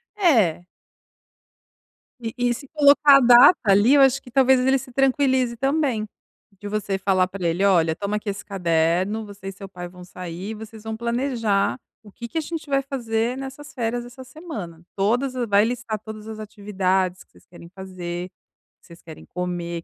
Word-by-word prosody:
É. 225 Hz, -, +2 dB, 1.5 s
E 230 Hz, -2 st, -5 dB
e 245 Hz, -1 st, +1 dB
se 275 Hz, +4 st, -9 dB
colocar 285 Hz, -1 st, +6 dB
a -, -, +5 dB
data, 245 Hz, +7 st, +7 dB
ali, 205 Hz, +4 st, +4 dB
eu 285 Hz, -, +6 dB
acho 270 Hz, 0 st, +4 dB
que 250 Hz, -, -14 dB
talvez 265 Hz, 0 st, +4 dB
ele 265 Hz, +2 st, +3 dB
se 255 Hz, 0 st, -9 dB
tranquilize 260 Hz, -1 st, +1 dB
também, 270 Hz, -4 st, 0 dB, 0.5 s
de 205 Hz, -, -7 dB
você 205 Hz, -1 st, -2 dB
falar 190 Hz, -1 st, +1 dB
pra 185 Hz, -1 st, -6 dB
ele: 175 Hz, +4 st, +1 dB
"Olha 165 Hz, -5 st, +3 dB
toma 200 Hz, +3 st, -3 dB
aqui 210 Hz, 0 st, -5 dB
esse 200 Hz, 0 st, -6 dB
caderno, 180 Hz, +2 st, 0 dB
você 200 Hz, -2 st, -11 dB
e 195 Hz, -, -3 dB
seu 195 Hz, +1 st, -10 dB
pai 180 Hz, -2 st, -8 dB
vão 180 Hz, 0 st, -13 dB
sair, 180 Hz, +2 st, -7 dB
e -, -, -4 dB
vocês 220 Hz, 0 st, -11 dB
vão 220 Hz, 0 st, -4 dB
planejar 235 Hz, -, 0 dB, 0.3 s
o 210 Hz, -, -15 dB
que 235 Hz, +4 st, -8 dB
que 315 Hz, -, -6 dB
a -, -, +1 dB
gente 315 Hz, -1 st, -6 dB
vai 275 Hz, 0 st, +2 dB
fazer 240 Hz, -3 st, -2 dB
nessas 275 Hz, +3 st, -9 dB
férias 240 Hz, -1 st, -2 dB
essa 255 Hz, +2 st, -11 dB
semana. 245 Hz, -, -8 dB
Todas 240 Hz, +7 st, 0 dB
vai 205 Hz, 0 st, +4 dB
listar 230 Hz, -2 st, -3 dB
todas 215 Hz, 0 st, -10 dB
as 220 Hz, -1 st, -7 dB
atividades 190 Hz, -3 st, -2 dB
que -, -, -41 dB
vocês -, -, -22 dB
querem 170 Hz, -1 st, -14 dB
fazer, 180 Hz, -2 st, -6 dB, 0.5 s
o -, -, -80 dB
que -, -, -22 dB
vocês 170 Hz, 0 st, -15 dB
querem 160 Hz, -2 st, -12 dB
comer", 175 Hz, -1 st, -4 dB
215 Hz, 190 wpm, -23 LUFS, 185-255 Hz, 1.5 s, data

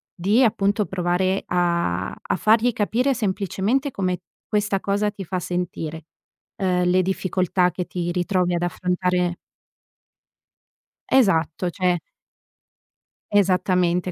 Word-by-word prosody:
di 205 Hz, +8 st, +3 dB
appunto 205 Hz, -2 st, +2 dB
provare 185 Hz, +1 st, 0 dB
a 170 Hz, -, 0 dB
a -, -, -3 dB
fargli 225 Hz, +5 st, +3 dB
capire 240 Hz, +6 st, +1 dB
semplicemente 215 Hz, +4 st, -1 dB
come 185 Hz, -3 st, -1 dB, 0.3 s
questa 210 Hz, -2 st, 0 dB
cosa 205 Hz, +1 st, 0 dB
ti 200 Hz, -1 st, -8 dB
fa 185 Hz, +2 st, -2 dB
sentire; 170 Hz, -3 st, -4 dB, 0.5 s
uhm, 180 Hz, -2 st, +1 dB
le 185 Hz, +1 st, +4 dB
difficoltà 185 Hz, -1 st, 0 dB
che 180 Hz, -, -4 dB
ti 175 Hz, -1 st, -3 dB
ritrovi 180 Hz, 0 st, 0 dB
ad 170 Hz, -, -1 dB
affrontare 180 Hz, 0 st, 0 dB, 1.7 s
Esatto, 180 Hz, -, +2 dB
cioè 180 Hz, 0 st, +1 dB, 1.3 s
Esattamente, 180 Hz, -2 st, +2 dB
185 Hz, 105 wpm, -23 LUFS, 175-200 Hz, 1.7 s, le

